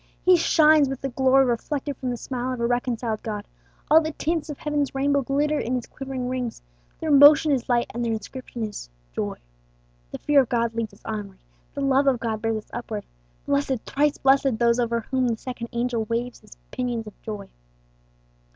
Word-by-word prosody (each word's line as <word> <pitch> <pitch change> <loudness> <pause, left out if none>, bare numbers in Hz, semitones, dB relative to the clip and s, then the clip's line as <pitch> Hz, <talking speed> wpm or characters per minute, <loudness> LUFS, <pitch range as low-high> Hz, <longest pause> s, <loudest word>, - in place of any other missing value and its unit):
He 365 0 +6
shines 310 -4 +5
with 270 -1 -5
the 270 - -2
glory 265 +1 +4
reflected 275 +4 -2
from 255 - -4
the 245 - -2
smile 255 +1 -3
of 250 - -6
a 235 - 0
reconciled 240 -2 -1
God; 210 -2 -5 0.5
all 320 +1 +8
the 315 -1 -3
tints 325 0 -2
of 295 - -5
heaven's 295 -2 -2
rainbow 280 +1 +2
glitter 290 +3 0
in 250 +2 -1
his 245 - -3
quivering 265 -2 -5
wings, 250 -2 -4 0.4
their 315 - -1
motion 290 +2 +8
is 260 -2 0
light, 240 -1 +1
and 240 - -2
their 230 - 0
inscription 230 +2 -6
is 210 - -6 0.2
"joy." - - -3 0.7
The - - -6
fear 290 -2 +4
of 255 - -3
God 235 -2 0
leads 225 -3 -3
us - - -26
onward, 205 -3 -5 0.4
the 280 - -3
love 275 0 +3
of 260 -3 +3
God 220 -2 -3
bears 225 -1 0
us - - -31
upward. 220 -3 -5 0.4
Blessed, 280 -4 0
thrice 290 +1 +1
blessed, 270 -3 +3
those 235 +1 +3
over 235 -1 0
whom 260 +2 0
the 230 -2 0
second 240 -1 -6
angel 235 -1 -1
waves 235 +2 -3
his 215 -2 -17
pinions 245 -3 -2
of 210 - -10
joy! 210 -3 -7
250 Hz, 195 wpm, -24 LUFS, 230-275 Hz, 0.7 s, all